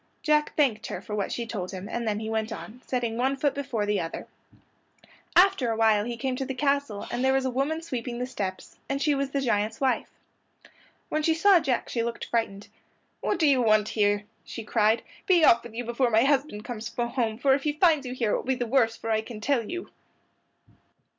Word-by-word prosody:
Jack 300 -1 +2
thanked 265 -8 +1
her - - -4
for 210 - -8
what 205 -2 -1
she 235 - -3
told 200 -5 -4
him, 190 0 -7
and 235 +1 -3
then 210 -1 0
he 220 - -5
went 220 0 -2
on, 225 +2 -8
setting 240 -3 -1
one 265 +3 +1
foot 285 0 +1
before 265 -7 -2
the 205 -1 +1
other. 165 -1 -5 1.1
After 365 -9 +5
awhile 220 -2 +3
he 240 0 -4
came 260 +1 -2
to 270 - -2
the 265 - -4
castle, 280 -6 0
and 245 - -1
there 265 0 +3
was 270 0 +1
a 260 - 0
woman 290 +6 -1
sweeping 245 -6 -4
the 250 - -2
steps, 195 -7 -5
and 275 0 -1
she 295 +1 +2
was 275 -1 -1
the 275 0 -1
giant's 220 -3 0
wife. 265 -2 0 1.0
When 310 - 0
she 320 +1 +2
saw 380 +2 +6
Jack 270 -6 -1
she 235 - -2
looked 235 0 -3
frightened. 205 -4 -2 0.5
"What - - -1
do 330 - +2
you 270 -3 +4
want 215 -2 +3
here?" 205 -1 +1 0.2
she 230 - -7
cried. 215 +1 +2 0.2
"Be 350 -5 +5
off 235 -3 +6
with 235 -2 -11
you 245 +1 -3
before 240 +2 +1
my 225 0 +4
husband 270 -6 0
comes 225 -2 -5
home, 235 -2 -1
for 265 +2 +3
if 275 - +1
he 295 +1 0
finds 310 -2 +3
you 250 - -5
here 230 -4 0
it - - +2
will - - -5
be 260 0 0
the 245 -1 -2
worse 230 -2 +2
for 225 - -4
you 220 - +3
I - - -1
can 220 -1 -9
tell 235 -1 0
you." 355 0 -6
240 Hz, 225 wpm, -27 LUFS, 220-275 Hz, 1.1 s, saw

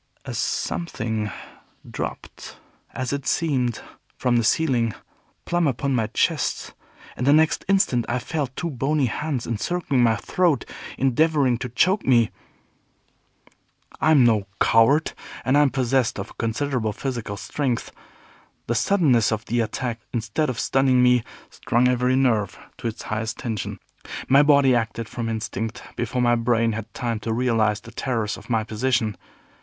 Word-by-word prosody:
A - - -5
Something 110 -10 -2 0.6
dropped, - - -7 0.3
as 130 +1 -3
it 140 -1 -4
seemed, 130 -8 0 0.4
from 125 -1 +2
the 115 - +2
ceiling, 120 -5 +1 0.5
plumb 175 -2 +1
upon 135 +1 -1
my 115 -4 +1
chest, - - -1 0.4
and 125 - -2
the - - +6
next 155 +1 +3
instant 185 -12 +2
I 120 - 0
felt 135 0 -3
two 170 -2 -3
bony 140 +2 0
hands 135 +1 -2
encircling 135 +4 -1
my 115 -2 +4
throat, 170 - +1 0.3
endeavoring 135 -1 +2
to 125 - -4
choke 185 - +2
me. 120 -4 +3 1.7
I - - +2
am 150 -5 +6
no 110 -4 +2
coward, 135 +8 +4 0.3
and 130 - +3
am 145 -1 +5
possessed 130 -2 0
of 95 - -7
considerable 115 -1 -1
physical 120 -5 -4
strength. 125 +3 -2 0.7
The 120 - -1
suddenness 125 - +3
of 110 0 -2
the 120 +2 -1
attack, 120 +1 -2
instead 120 +6 -1
of 125 - -3
stunning 130 -2 +3
me, 125 -1 +4 0.3
strung 120 +2 +1
every 125 0 +2
nerve 115 -7 +1 0.2
to - - -3
its 110 - -5
highest 110 +1 -3
tension. 115 -5 -4 0.5
My 135 +2 +6
body 140 -3 +5
acted 115 -1 -1
from 115 0 -4
instinct, 110 +1 -4
before 125 +1 -1
my 120 0 +4
brain 115 -1 +2
had 110 0 -6
time 115 -3 -2
to 115 - -4
realize 110 -3 +1
the 115 - -12
terrors 115 -3 -2
of - - -14
my 115 -2 +1
position. 110 -1 0
125 Hz, 150 wpm, -23 LUFS, 115-135 Hz, 1.7 s, the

